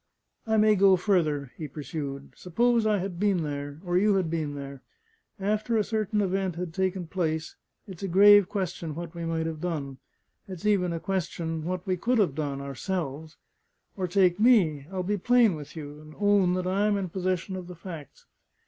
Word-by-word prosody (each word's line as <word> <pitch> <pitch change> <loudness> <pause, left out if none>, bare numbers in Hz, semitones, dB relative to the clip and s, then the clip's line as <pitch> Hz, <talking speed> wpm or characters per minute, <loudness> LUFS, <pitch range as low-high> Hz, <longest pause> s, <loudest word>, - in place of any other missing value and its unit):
"I 220 0 +2
may 215 0 +5
go 195 -1 +6
further," 155 - 0
he 155 - -5
pursued. 140 -1 -6
"Suppose 230 +5 +1
I 210 -1 +3
had 185 -2 -4
been 195 -4 +2
there, 145 0 -5
or 175 0 +2
you 205 +1 +3
had 180 -4 0
been 155 -3 -2
there: 140 -1 -8 0.6
after 215 +3 0
a 215 - +3
certain 215 -1 -1
event 190 -2 -1
had 175 -1 -5
taken 185 0 -1
place, 160 -2 -2 0.3
it's 185 -4 -10
a 195 - -2
grave 200 +1 +7
question 175 -6 -3
what 170 0 -6
we 170 -1 -5
might 165 -1 -1
have 160 -1 -4
done 145 -7 -4 0.5
it's 185 -1 -8
even 195 -4 +2
a 165 - -3
question 165 -4 -3
what 180 0 -3
we 185 -2 0
could 240 +7 +1
have 190 -10 +2
done 140 -1 -3
ourselves. 155 +1 -4 0.6
Or 185 -2 -2
take 180 0 +3
me. 180 - +4
I - - -8
will 185 - -1
be 205 +3 -1
plain 240 -1 +4
with 150 -1 -9
you, 150 -1 -8
and 155 0 -14
own 200 -3 +3
that 185 0 -2
I 195 +3 +1
am 205 -1 +2
in 190 -2 -3
possession 185 +1 -2
of 185 -2 -7
the 180 - -9
facts. 165 -5 -10
180 Hz, 195 wpm, -27 LUFS, 155-195 Hz, 0.6 s, grave